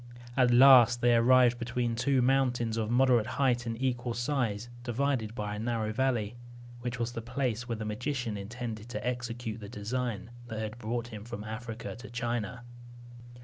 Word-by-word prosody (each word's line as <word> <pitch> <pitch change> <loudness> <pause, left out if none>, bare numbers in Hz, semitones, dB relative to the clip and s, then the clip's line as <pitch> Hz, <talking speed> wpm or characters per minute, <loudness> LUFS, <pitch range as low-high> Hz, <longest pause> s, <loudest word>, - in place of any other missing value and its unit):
At 125 -2 +4
last 120 -1 +7
they 120 0 +5
arrived 120 0 +5
between 120 0 -1
two 130 +2 +2
mountains 125 -3 +2
of 110 -1 -1
moderate 125 -2 +4
height 125 -3 +2
and 115 0 -3
equal 125 -2 -1
size, 120 -3 -1 0.2
divided 120 -2 -1
by 105 -2 -3
a 105 - -5
narrow 110 -1 -1
valley, 120 -4 0 0.5
which 120 0 -4
was 120 0 -2
the 115 - -5
place 125 0 -2
where 115 - 0
the 110 -1 -5
magician 120 +1 -2
intended 110 +2 -6
to 110 0 -4
execute 120 -2 -3
the 100 -2 -9
design 115 +1 -3 0.2
that 110 - -6
had 110 +2 -4
brought 120 +1 -3
him 105 -3 -8
from 115 -2 -7
Africa 110 +1 -6
to 125 - -10
China. 120 -1 -3
120 Hz, 170 wpm, -30 LUFS, 110-125 Hz, 0.5 s, last